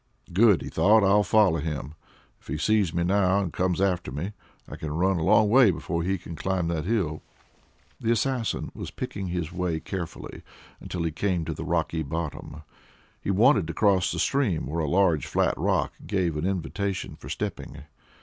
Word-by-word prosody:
"Good!" 100 -3 +5
he - - -6
thought; 110 +1 +4
"I'll 100 +2 +5
follow 100 -4 +3
him. 75 -2 -4 0.5
If - - -25
he 70 - -3
sees 105 +1 +2
me 85 0 0
now, 95 +1 +2
and 95 -5 -3
comes 90 -1 0
after 90 -7 0
me, 80 +10 -4 0.4
I - - -8
can 80 - -5
run 90 +3 +1
a - - -1
long 105 +4 +5
way 120 +1 +6
before 85 -1 -2
he 95 +3 0
can 85 -1 -9
climb 90 -1 -1
that 80 -2 -2
hill." 95 -8 -1 0.8
The 115 - 0
assassin 120 0 -1
was - - -6
picking 100 -2 -5
his 85 -2 -3
way 90 -2 -2
carefully 85 -1 -6 0.4
until 90 -2 -4
he 80 - -1
came 90 0 -1
to - - -3
the - - -6
rocky 80 - -1
bottom. 80 0 -5 0.6
He - - -4
wanted 105 - +4
to 85 - -5
cross 100 -4 +3
the - - -4
stream 125 - +1
where 80 +2 -2
a 75 - -1
large 90 -4 +2
flat - - +1
rock - - 0
gave 90 -5 0
an 75 +4 -1
invitation 95 +1 -3
for - - -11
stepping. - - -5
90 Hz, 190 wpm, -26 LUFS, 80-100 Hz, 0.8 s, way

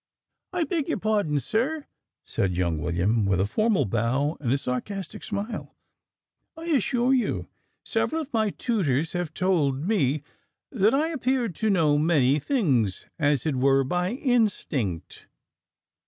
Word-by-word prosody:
"I 360 -3 0
beg 325 -3 -2
your - - 0
pardon, 205 -9 +1
sir," 260 - -1 0.4
said 90 -3 -1
young 85 -3 0
William 90 +8 +1
with 100 -2 +1
a 95 - +3
formal 215 - +1
bow 130 - 0
and 125 -5 -1
a 135 - +3
sarcastic 160 +10 -4
smile, 215 +3 -5 0.8
"I 325 - -8
assure 260 -4 +2
you 255 -3 0 0.4
several 320 - 0
of 290 - -15
my 220 -2 +2
tutors 165 - 0
have 175 -3 -2
told 160 -7 +1
me, 150 - +1 0.5
that 220 0 +3
I 310 +3 +1
appear 260 -5 0
to 215 +5 -1
know 155 -7 +3
many 150 -3 +3
things 140 - 0
as 145 -4 +2
it 155 -4 0
were 135 +1 +4
by 180 - -1
instinct." 200 - -1
175 Hz, 140 wpm, -26 LUFS, -, 0.8 s, were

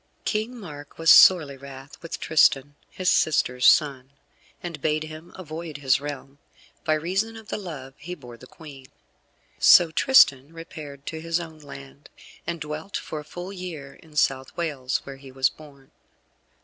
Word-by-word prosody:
King 220 +3 -2
Mark 145 -7 -11
was 165 0 +5
sorely 155 -7 +7
wrath 135 +1 -12
with 165 - -6
Tristan, 145 -2 +3 0.2
his 185 - -5
sister's 125 -7 +3
son, 135 -4 +3 0.5
and 170 -4 -6
bade 155 +1 0
him 155 +2 -10
avoid 160 -3 -7
his 135 -1 +2
realm, 145 -1 -8 0.4
by 155 - +2
reason 190 +8 -2
of 220 -1 -13
the - - -2
love 145 -9 -8
he 175 +5 -7
bore 125 -7 -12
the 130 +2 -15
Queen. 140 -4 -13 0.7
So 170 -2 +7
Tristan 155 - +4
repaired 150 -4 -10
to 160 -1 -6
his 165 +1 -1
own 160 -2 -9
land, 70 - -12 0.4
and 170 -1 -3
dwelt 150 +5 -5
for 155 - -6
a - - -9
full 175 +5 -8
year 165 -7 -8
in 160 -2 -19
South 135 -3 0
Wales, 140 -6 -2
where 135 -1 -9
he 135 -1 -13
was 130 0 +2
born. 140 -3 -17
150 Hz, 160 wpm, -25 LUFS, 135-170 Hz, 0.7 s, sorely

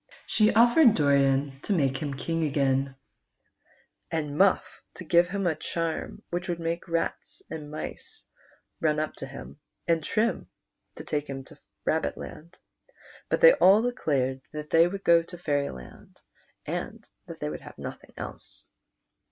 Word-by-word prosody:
She 215 0 +3
oftered 240 +2 +6
Doran 140 -1 +2
to 205 - -1
make 135 -6 +1
him 140 -1 -4
king 165 +4 -2
again, 135 -2 +1 1.1
and 150 -3 -2
Muff 190 +3 +2
to - - -8
give 175 +1 +4
him 195 0 -2
a 170 - +3
charm 165 +1 -4
whicli 180 +1 -2
would 170 -1 -2
make 165 +1 -3
rats 170 - -3
and 150 -2 -6
mice 155 - -7 0.5
run 155 -1 +1
u[) 155 0 -1
to 135 - -6
him, 135 +2 -10 0.3
and 165 -2 +2
Trim 220 +8 0 0.5
to - - -8
take 150 -1 -2
him 135 -1 -5
to - - -17 0.3
Rabbitland, 155 - -3 0.7
but - - 0
they - - +10
all 200 - +6
three 245 - +1
declared 135 - -1
that 150 0 -6
the\' 165 +1 +6
would 195 +2 -6
go 170 0 +6
to 175 +1 -11
Fairyland, 145 - -4 0.5
and - - -5 0.2
that - - -9
they 75 - -3
would 75 - -6
have - - -12
nothing - - -9
else. - - -9
160 Hz, 155 wpm, -27 LUFS, 140-175 Hz, 1.1 s, they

